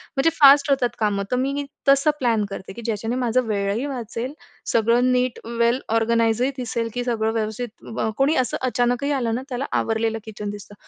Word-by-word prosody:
म्हणजे 270 +4 +3
फास्ट 285 -1 +6
होतात 265 -3 +2
कामं 205 -2 +1
तर - - +2
मी 275 +3 -1 0.2
तसं 275 +2 +5
प्लॅन 230 -4 +2
करते, 190 -1 -7
की 235 - -9
ज्याच्याने 225 +1 -2
माझा 250 0 +1
वेळही 205 +2 -1
वाचेल 245 -1 -4 0.4
सगळं 235 +3 +3
नीट 250 -1 0 0.2
वेल 235 +2 +3 0.2
ऑर्गनाइजही 230 +2 +2
दिसेल, 235 -2 -2
की 245 - -2
सगळं 225 -3 0
व्यवस्थित 220 +1 -4 0.3
कोणी 275 +4 +3
असं - - -3
अचानकही 245 +2 0
आलं 240 -5 0
ना 250 - -3
त्याला 255 +1 -3
आवरलेलं 225 0 0
किचन 210 -1 -6
दिसतं. 205 0 -9
240 Hz, 170 wpm, -22 LUFS, 225-255 Hz, 0.4 s, फास्ट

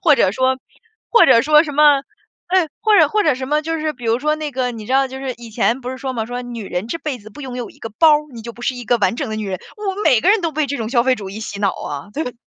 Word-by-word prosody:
或 310 -4 +6
者 190 - +3
说 260 +2 +1 0.5
或 475 - +6
者 230 - +6
说 300 +2 +5
什 295 - -5
么 290 -1 +5 0.5
对， 360 -2 +2
或 430 -1 +4
者 - - +7
或 425 -1 +1
者 305 -4 +3
什 260 +1 -6
么 300 +1 +2
就 325 +1 -3
是 310 0 -1
比 245 -4 -13
如 225 +1 +2
说 305 +2 +1
那 305 -1 -4
个， 255 -1 -1
你 225 -3 -8
知 255 - -3
道 270 0 +4
就 265 +1 -8
是 265 -2 -4
以 235 -1 -11
前 230 +3 0
不 250 - -4
是 260 - -7
说 265 0 -4
嘛， 225 -2 -2
说 245 +2 -5
女 240 -3 -7
人 180 +4 -3
这 285 - -2
辈 295 -6 -4
子 215 -1 -13
不 220 - -13
拥 260 -2 -6
有 245 -2 -5
一 - - -20
个 225 - -7
包， 325 - +7 0.2
你 235 - -9
就 235 +1 -8
不 240 - -13
是 255 - 0
一 245 - -7
个 240 +2 +2
完 210 +2 +1
整 - - -3
的 215 - -4
女 215 -1 -4
人， 185 -1 -3 0.2
我 410 -2 -3
们 410 - -4
每 255 -8 +5
个 380 - +5
人 430 0 +4
都 335 -2 -1
被 305 0 0
这 280 +1 -3
种 220 -2 -3
消 240 -1 +2
费 260 +1 +3
主 200 -3 -7
义 200 +3 -7
洗 205 -2 -6
脑 200 -2 +1
啊。 145 +6 -6
对。 250 -6 -4
260 Hz, 350 characters per minute, -19 LUFS, 230-300 Hz, 0.5 s, 者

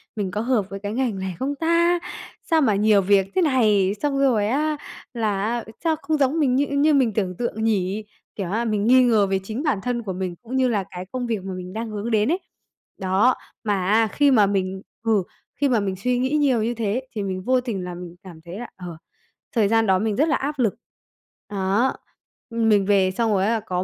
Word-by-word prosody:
"Mình 200 -4 -2
có 210 - -2
hợp 230 -5 0
với 195 - -6
cái 205 +1 -4
ngành 235 -5 -1
này 190 -1 -4
không 280 +2 -2
ta? 335 +3 +2 0.4
Sao 325 -1 +2
mà 220 -8 +3
nhiều 210 0 +4
việc 195 0 +3
thế 375 - +3
này." 215 - +3
Xong 285 -2 0
rồi 240 -7 +3
á, 300 +6 0 0.4
là 215 -5 -1
á, 235 +2 -1 0.2
"sao 325 -2 +2
không 305 +2 0
giống 285 +3 +1
mình 265 -5 +2
như 285 +2 +2
như 285 +2 +2
mình 260 -6 +3
tưởng 190 -3 -1
tượng 230 -2 -3
nhỉ?" 205 -1 0 0.3
Kiểu 190 -4 -4
á, 230 +3 0
mình 210 -2 0
nghi 255 +1 +6
ngờ 220 -5 +3
về 195 0 0
chính 220 +8 -4
bản 290 -10 +1
thân 245 -1 -2
của 195 -3 -4
mình 185 -1 -4
cũng 245 +2 -6
như 260 -1 +3
là 210 -5 0
cái 180 0 -6
công 250 -1 -3
việc 220 -5 -2
mà 190 0 -5
mình 185 0 -7
đang 225 +1 -4
hướng 215 +2 -4
đến 220 +5 +2
ấy, 355 - +1 0.6
đó. 195 +7 +2 0.3
Mà 200 -4 0
á, 220 +2 +4
khi 285 -1 +3
mà 215 -6 +5
mình 190 -1 -1 0.2
ừ, 220 -4 +2 0.3
khi 280 +2 +1
mà 240 -3 +3
mình 195 -2 -2
suy 245 +6 0
nghĩ 260 +1 0
nhiều 265 -7 +2
như 235 +2 0
thế 225 +1 -1
thì 210 - -2
mình 185 -1 -3
vô 255 +3 +2
tình 220 -7 -4
là 180 -1 -6
mình 175 -1 -9
cảm 175 -4 -12
thấy 175 +4 -7
là, 245 - -7
ờ, 175 -3 -8 0.6
thời 220 -3 +4
gian 225 +1 +3
đó 190 -1 +3
mình 215 0 -1
rất 300 +7 +2
là 295 - +3
áp 285 +1 -3
lực, 225 -6 +1 0.7
đó, 200 +5 +1 0.6
mình 220 -4 +3
về 195 -2 +3
xong 225 +3 0
rồi 195 -2 +2
á, 215 - +2
là 225 - 0
có 185 -4 -3
220 Hz, 235 wpm, -23 LUFS, 195-255 Hz, 0.7 s, nghi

